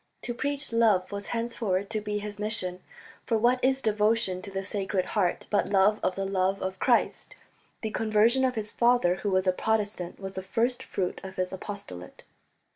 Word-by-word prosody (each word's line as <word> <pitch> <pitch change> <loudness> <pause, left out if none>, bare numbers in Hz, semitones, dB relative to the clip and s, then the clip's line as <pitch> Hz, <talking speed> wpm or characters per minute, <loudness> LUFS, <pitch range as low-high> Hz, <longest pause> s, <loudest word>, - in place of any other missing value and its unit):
To 240 - -3
preach 285 0 +1
love 215 -6 +3
was 200 0 -5
henceforward 225 -4 -2
to 215 -1 -1
be 210 0 -2
his 205 0 -6
mission, 190 -4 -1 0.5
for 230 - +2
what 245 +3 +2
is 265 +1 +2
devotion 215 -3 +1
to 200 - -8
the 195 0 -4
Sacred 195 -1 -1
Heart 185 -4 0
but 205 - +2
love 205 +2 +4
of 185 - 0
the 195 - -2
love 195 0 0
of 190 0 -4
Christ? - - +1 0.5
The 220 - -3
conversion 225 +4 +3
of 255 -1 +1
his 215 -1 -3
father, 235 -7 +3
who 205 - -2
was 185 0 +2
a 185 - +3
Protestant, 205 -4 -1
was 195 -1 -6
the 190 - -4
first 235 +6 0
fruit 180 -2 -3
of 190 0 -8
his 185 0 -2
apostolate. 185 - -8
205 Hz, 190 wpm, -28 LUFS, 190-225 Hz, 0.5 s, love